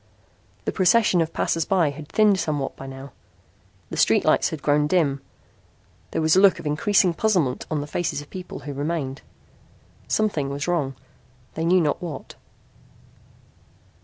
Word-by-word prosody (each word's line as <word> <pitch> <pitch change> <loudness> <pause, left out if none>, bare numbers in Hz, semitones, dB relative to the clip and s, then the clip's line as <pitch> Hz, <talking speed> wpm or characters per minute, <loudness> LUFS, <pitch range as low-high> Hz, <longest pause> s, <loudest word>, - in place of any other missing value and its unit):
The - - 0
procession 190 -1 +3
of 160 - -1
passers 165 - 0
by 170 -4 +2
had 150 +1 -10
thinned 210 -3 +3
somewhat 150 -4 -2
by 135 - -9
now. 135 +1 -9 0.8
The - - -5
street - - +3
lights - - +3
had 155 - -7
grown 150 0 +2
dim. 150 -5 +1 0.9
There - - -2
was 160 +1 +4
a - - +6
look 200 -2 +6
of 170 - -10
increasing 175 +5 +2
puzzlement 170 -10 0
on 155 -2 -1
the - - -4
faces 155 0 -2
of 145 - -9
the - - -31
people 180 -5 -8
who 145 +1 -6
remained. 145 -1 -3 0.9
Something 180 -11 0
was 140 +3 -4
wrong. 150 -7 -1 0.6
They 160 - -3
knew 180 +2 +4
not 150 -3 0
what. 160 -6 -7
155 Hz, 160 wpm, -23 LUFS, 145-180 Hz, 0.9 s, a